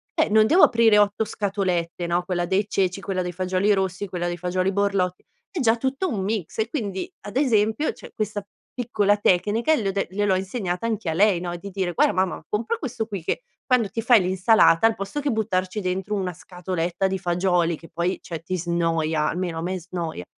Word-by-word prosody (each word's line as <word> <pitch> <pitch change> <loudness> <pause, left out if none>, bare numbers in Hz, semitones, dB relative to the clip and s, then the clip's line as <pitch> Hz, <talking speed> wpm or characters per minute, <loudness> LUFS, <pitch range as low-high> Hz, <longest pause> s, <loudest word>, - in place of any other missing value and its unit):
eh, - - +2
non 215 +1 +5
devo 345 +8 +5
aprire 225 -2 +5
8 205 +2 +2
scatolette, 185 -5 -2
no, 175 +1 +1
quella 175 -1 -1
dei 195 +3 0
ceci, 195 -1 0
quella 190 -2 -2
dei 180 - -3
fagioli 185 +3 +1
rossi, 190 0 -1
quella 180 -2 -3
dei 175 0 -3
fagioli 185 +2 0
borlotti, 195 -2 0 0.3
è 375 - -4
già 230 -2 +3
tutto 270 +9 -1
un 210 -9 -2
mix 210 -1 -3
e 220 +1 0
quindi 220 - -4
ad 205 +4 -6
esempio 225 0 +2
c'è - - -13
questa 210 -2 -3 0.3
piccola 210 -4 +1
tecnica 205 - +2
le 215 -8 -2
ho - - 0
de 195 0 -1
gliel'ho 200 0 +1
insegnata 190 0 -3
anche 215 -6 -2
a - - 0
lei, 195 +1 +3
no, 175 -1 -4
di 200 +3 -9
dire: 185 -2 -2
"Guarda - - +3
mamma 185 0 -1
compra 235 - -1
questo 240 - -4
qui 200 -6 -5
che 170 - -2 0.2
quando 250 -6 +2
ti 225 - -3
fai 240 -2 +6
l'insalata 185 0 +4
al 225 - 0
posto 200 +9 -4
che 285 0 0
buttarci 210 -3 -1
dentro 190 +2 -2
una 185 -3 -2
scatoletta 180 +1 -3
di 190 0 -1
fagioli 175 -1 +1
che 165 - -15
poi 170 +3 -1
cioè 165 -2 -6
ti 185 +2 -2
snoia, 165 -2 0
almeno 175 -1 -3
a - - -3
me 185 +2 -2
snoia, 170 - -5
190 Hz, 205 wpm, -24 LUFS, 180-215 Hz, 0.3 s, fai